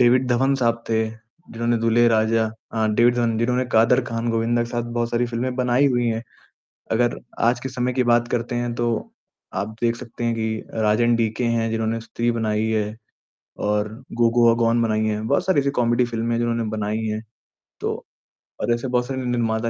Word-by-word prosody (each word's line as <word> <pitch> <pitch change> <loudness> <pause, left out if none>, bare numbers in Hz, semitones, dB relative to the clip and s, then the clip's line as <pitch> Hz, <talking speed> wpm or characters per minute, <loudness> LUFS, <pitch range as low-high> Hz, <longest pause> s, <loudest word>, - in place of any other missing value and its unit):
David 125 +1 +4
Dhawan 135 +3 +2
साहब 115 -3 0
थे, 110 0 +1
जिन्होंने 115 0 -4
दुल्हे 115 +1 +3
राजा 110 0 +2 0.3
अ, 110 -1 +1
डेविड 120 +3 +4
धवन 115 -2 +1
जिन्होंने 125 +2 +1
कादर 115 +3 +5
ख़ान, 115 0 -3
गोविंदा 115 +1 +1
के 120 - -5
साथ 120 0 -1
बहुत 120 0 -1
सारी 120 +1 +1
फिल्में 120 +2 -2
बनाई 125 +2 +3
हुई 120 -3 +1
है। 115 0 -1 0.7
अगर 120 +1 +2 0.2
आज 120 +1 +2
के 135 - -4
समय 125 0 -1
की 130 0 +1
बात 120 0 +3
करते 120 0 -2
है 120 0 -1
तो 120 0 0 0.7
आप 105 +3 -3
देख 120 0 +1
सकते 120 0 -7
है 115 - +1
कि 110 -1 -2
राज 110 0 +2
एन 120 0 +4
डीके 115 +1 0
हैं 115 -1 +1
जिन्होंने 115 0 -1
स्त्री 115 +1 -2
बनाई 110 -1 0
है 105 -1 -1 0.7
और 105 0 +1 0.3
गो 115 - +6
गोआ 115 -1 +6
गॉन 115 +1 +3
बनाई 110 -1 +1
है। 105 0 -1
बहुत 125 +6 0
सारी 190 -5 +3
ऐसी 140 - 0
कॉमेडी 120 +1 +3
फिल्में 115 0 -2
है - - 0
जिन्होंने 120 -1 0
बनाई 110 +1 -2
है, 110 0 -2 0.6
तो - - -3 0.6
और 120 - +2
ऐसे 120 +3 -2
बहुत 125 -1 0
सारे 130 -1 -3
निर्माता 115 -2 0
115 Hz, 200 wpm, -22 LUFS, 110-120 Hz, 0.7 s, गो